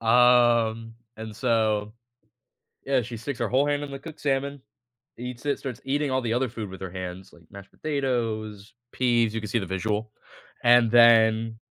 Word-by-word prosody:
Um, 115 Hz, -1 st, +3 dB, 0.2 s
and 110 Hz, -1 st, -8 dB
so 110 Hz, -3 st, 0 dB, 0.9 s
yeah, 135 Hz, -2 st, +1 dB
she 120 Hz, +1 st, -7 dB
sticks 125 Hz, +4 st, -6 dB
her -, -, 0 dB
whole 135 Hz, +3 st, +2 dB
hand 145 Hz, 0 st, 0 dB
in 145 Hz, -, -6 dB
the 135 Hz, -, -6 dB
cooked 160 Hz, +2 st, -11 dB
salmon, 140 Hz, -1 st, -1 dB, 0.6 s
eats 125 Hz, +2 st, -7 dB
it, 145 Hz, -, 0 dB
starts 125 Hz, -5 st, -6 dB
eating 145 Hz, +2 st, 0 dB
all 130 Hz, 0 st, +1 dB
the 115 Hz, -1 st, -1 dB
other 125 Hz, 0 st, 0 dB
food 110 Hz, -3 st, -6 dB
with 95 Hz, 0 st, -11 dB
her 95 Hz, -, -5 dB
hands, 95 Hz, +1 st, -7 dB
like 85 Hz, -, -19 dB
mashed 100 Hz, 0 st, -12 dB
potatoes, 115 Hz, -8 st, -3 dB, 0.2 s
peas 120 Hz, -3 st, +1 dB
you -, -, -1 dB
can 105 Hz, -, -6 dB
see 115 Hz, -, +1 dB
the 95 Hz, -, -4 dB
visual, 105 Hz, +4 st, -3 dB, 0.5 s
and 120 Hz, -1 st, +5 dB
then 115 Hz, -1 st, +5 dB
115 Hz, 180 wpm, -25 LUFS, 110-130 Hz, 0.9 s, and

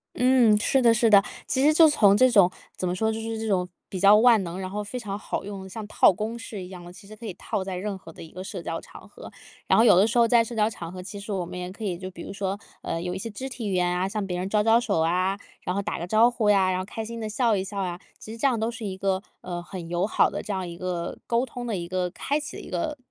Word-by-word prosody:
嗯， 250 Hz, -4 st, +5 dB
是 265 Hz, +5 st, +2 dB
的 235 Hz, -2 st, +6 dB
是 230 Hz, 0 st, +3 dB
的。 200 Hz, -2 st, +7 dB, 0.2 s
其 260 Hz, -, +1 dB
实 305 Hz, +2 st, +5 dB
就 320 Hz, 0 st, +7 dB
从 205 Hz, -9 st, +5 dB
这 255 Hz, +3 st, +6 dB
种 200 Hz, -7 st, +5 dB, 0.2 s
怎 -, -, -3 dB
么 175 Hz, -, 0 dB
说， 220 Hz, +4 st, 0 dB
就 220 Hz, -, -4 dB
是 225 Hz, 0 st, -4 dB
这 225 Hz, -, -3 dB
种 180 Hz, -3 st, 0 dB, 0.2 s
比 190 Hz, -, -6 dB
较 200 Hz, +3 st, +7 dB
万 230 Hz, -1 st, +6 dB
能， 175 Hz, +1 st, -6 dB
然 185 Hz, -1 st, -4 dB
后 210 Hz, +2 st, -3 dB
非 245 Hz, +5 st, -6 dB
常 200 Hz, -3 st, -5 dB
好 205 Hz, -, -4 dB
用， 195 Hz, -2 st, -7 dB
像 210 Hz, +2 st, -7 dB
套 -, -, +5 dB
公 215 Hz, +5 st, -4 dB
式 225 Hz, -3 st, -7 dB
一 180 Hz, -, -7 dB
样 180 Hz, -2 st, -10 dB
的， 175 Hz, -, -10 dB
其 195 Hz, +2 st, -15 dB
实 215 Hz, -, -11 dB
可 225 Hz, +2 st, -11 dB
以 205 Hz, -, -4 dB
套 190 Hz, -, -3 dB
在 190 Hz, -1 st, -4 dB
任 200 Hz, +1 st, -3 dB
何 175 Hz, -3 st, -13 dB
的 -, -, -13 dB
一 160 Hz, -, -10 dB
个 185 Hz, +3 st, -8 dB
社 190 Hz, -1 st, -6 dB
交 165 Hz, 0 st, -4 dB
场 -, -, -14 dB
合。 -, -, -12 dB, 0.4 s
然 -, -, +4 dB
后 225 Hz, -, +6 dB
有 210 Hz, -, +7 dB
的 190 Hz, +3 st, +6 dB
时 230 Hz, +2 st, -1 dB
候 235 Hz, -1 st, +6 dB
在 235 Hz, 0 st, +5 dB
社 230 Hz, -, -8 dB
交 215 Hz, -1 st, +2 dB
场 170 Hz, -6 st, -8 dB
合， 185 Hz, 0 st, -7 dB
其 200 Hz, +2 st, -8 dB
实 200 Hz, +1 st, -7 dB
我 190 Hz, -3 st, -1 dB
们 180 Hz, +1 st, -8 dB
也 180 Hz, 0 st, -5 dB
可 215 Hz, +3 st, -7 dB
以 180 Hz, -4 st, -2 dB
就 185 Hz, +1 st, -7 dB
比 170 Hz, -2 st, -9 dB
如 -, -, -7 dB
说， 200 Hz, 0 st, -3 dB, 0.2 s
呃， 165 Hz, -, -3 dB
有 180 Hz, +1 st, -3 dB
一 -, -, -3 dB
些 210 Hz, +4 st, -5 dB
肢 240 Hz, +5 st, -6 dB
体 245 Hz, -5 st, -5 dB
语 -, -, -1 dB
言 180 Hz, -1 st, +2 dB
啊， 180 Hz, +1 st, 0 dB
向 210 Hz, -1 st, -3 dB
别 180 Hz, -1 st, -3 dB
人 185 Hz, +2 st, -3 dB
招 210 Hz, 0 st, +2 dB
招 225 Hz, +2 st, +5 dB
手 205 Hz, -8 st, 0 dB
啊， 185 Hz, +4 st, +1 dB, 0.2 s
然 180 Hz, -, -2 dB
后 200 Hz, -, -1 dB
打 -, -, -3 dB
个 170 Hz, -, -4 dB
招 220 Hz, +6 st, +5 dB
呼 230 Hz, -4 st, 0 dB
呀， 195 Hz, -2 st, +4 dB
然 185 Hz, -, 0 dB
后 185 Hz, -, -2 dB
开 220 Hz, +3 st, -6 dB
心 230 Hz, +1 st, -6 dB
的 215 Hz, -, -3 dB
笑 230 Hz, 0 st, +2 dB
一 190 Hz, -, -1 dB
笑 200 Hz, +1 st, -6 dB
啊。 180 Hz, -2 st, -2 dB, 0.2 s
其 220 Hz, -, -9 dB
实 230 Hz, -, -8 dB
这 230 Hz, -, -2 dB
样 250 Hz, -5 st, +3 dB
都 220 Hz, +1 st, 0 dB
是 230 Hz, -1 st, -7 dB
一 190 Hz, -2 st, -4 dB
个， 190 Hz, -1 st, 0 dB, 0.2 s
呃， 175 Hz, -1 st, -6 dB
很 175 Hz, -2 st, -8 dB
友 175 Hz, +2 st, 0 dB
好 215 Hz, -, +3 dB
的 -, -, -5 dB
这 -, -, -5 dB
样 190 Hz, -2 st, -2 dB
一 170 Hz, 0 st, -8 dB
个 175 Hz, -1 st, -4 dB
沟 235 Hz, +2 st, +1 dB
通 245 Hz, 0 st, -7 dB
的 225 Hz, -4 st, -2 dB
一 170 Hz, -1 st, -5 dB
个 180 Hz, 0 st, -1 dB
开 285 Hz, -, -1 dB
启 300 Hz, +2 st, -7 dB
的 -, -, -7 dB
一 -, -, -11 dB
个， 310 Hz, -3 st, -2 dB
200 Hz, 340 characters per minute, -25 LUFS, 185-225 Hz, 0.4 s, 的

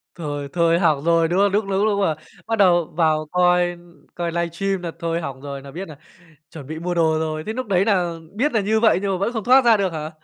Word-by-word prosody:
Thôi 145 Hz, -4 st, -5 dB
thôi 170 Hz, 0 st, +2 dB
hỏng 155 Hz, -5 st, +2 dB
rồi, 165 Hz, -1 st, +3 dB
đúng 180 Hz, +3 st, 0 dB
không? 200 Hz, -1 st, +3 dB
Lúc 210 Hz, +1 st, +1 dB
lúc 195 Hz, +2 st, +1 dB
lúc 205 Hz, -2 st, +1 dB
mà 160 Hz, -6 st, +1 dB, 0.3 s
bắt 225 Hz, -, 0 dB
đầu 175 Hz, -4 st, +4 dB
vào 155 Hz, -2 st, +2 dB
coi 180 Hz, -1 st, +2 dB, 0.4 s
coi 170 Hz, -1 st, -3 dB
livestream 175 Hz, +3 st, -2 dB
nà 170 Hz, -2 st, -4 dB
thôi 170 Hz, 0 st, -2 dB
hỏng 135 Hz, -3 st, -7 dB
rồi, 140 Hz, -1 st, -7 dB
nà 140 Hz, 0 st, -11 dB
biết 180 Hz, +5 st, -7 dB
nà 150 Hz, -3 st, -11 dB, 0.5 s
chuẩn 145 Hz, -5 st, -10 dB
bị 160 Hz, +1 st, -6 dB
mua 175 Hz, +1 st, -3 dB
đồ 160 Hz, -2 st, +2 dB
rồi. 155 Hz, -1 st, -3 dB
Thế 220 Hz, -, -2 dB
lúc 255 Hz, 0 st, -4 dB
đấy 190 Hz, -1 st, +2 dB
nà 180 Hz, -5 st, +1 dB, 0.2 s
biết 275 Hz, +7 st, 0 dB
nà 220 Hz, -, +2 dB
như 220 Hz, +2 st, +1 dB
vậy 220 Hz, -5 st, +4 dB
nhưng 200 Hz, -, -1 dB
mà -, -, 0 dB
vẫn 215 Hz, +5 st, -1 dB
không 225 Hz, -4 st, -4 dB
thoát 260 Hz, +1 st, +5 dB
ra 230 Hz, -2 st, +6 dB
được 190 Hz, -4 st, -1 dB
hả? 155 Hz, 0 st, -5 dB
175 Hz, 260 wpm, -21 LUFS, 160-200 Hz, 0.5 s, ra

